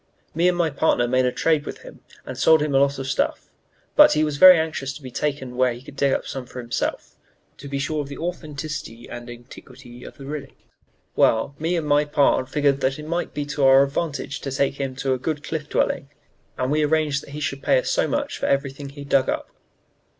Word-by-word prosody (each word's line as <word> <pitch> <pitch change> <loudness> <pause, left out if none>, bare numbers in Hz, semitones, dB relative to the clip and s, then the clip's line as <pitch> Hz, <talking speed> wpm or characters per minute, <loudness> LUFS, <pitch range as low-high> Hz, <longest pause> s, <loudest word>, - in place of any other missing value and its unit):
Me 170 +3 +2
and 180 -1 +2
my 165 -3 +1
partner 140 -4 +2
made 130 +1 +2
a - - +1
trade 155 +2 +1
with - - -8
him - - -12 0.3
and - - -6
sold 160 0 +5
him 150 -2 -2
a 135 - +5
lot 140 0 +2
of 135 - -5
stuff; 130 0 -1 0.5
but - - +8
he 155 - +2
was 150 -2 -1
very 185 +2 +10
anxious 155 -4 -2
to 150 - -12
be 130 - -8
taken 135 -2 -3
where 125 -1 +2
he 120 - -10
could 140 - -12
dig 140 -1 +1
some 135 - -5
up 125 - -15
for 125 - -8
himself, 120 -1 -3 0.4
'to 140 - -10
be 140 0 -3
sure 150 +2 -1
of 140 - -6
the 140 - -8
authenticity 150 -8 -6
and 120 0 -8
antiquity 125 +1 -12
of - - -11
the 135 - -10
relics.' 140 -1 -6 0.6
Well, 115 +5 +2
me 165 +3 0
and 160 - -2
my 145 0 +3
pard 140 -3 +2
figured 145 0 +2
up - - -15
that 135 +1 0
it 150 - -8
might 170 +2 -3
be 145 -1 -2
to 145 0 -2
our 135 0 +7
advantage 145 0 -3
to 140 - -4
take 135 +1 -1
him 135 -1 -3
to 135 0 -1
a 130 - -2
good 150 +2 -3
Cliff 155 -2 -5
Dwelling, 140 - 0 0.5
and 130 +1 -1
we 155 +1 +2
arranged 150 -2 +1
that - - -14
he 150 - -5
should 140 -2 -3
pay - - +3
us - - -1
so - - +1
much 285 0 -2
for - - -1
everything 140 0 -1
he 140 +1 -10
dug 140 -2 +2
up. - - -3
140 Hz, 240 wpm, -23 LUFS, 135-150 Hz, 0.6 s, very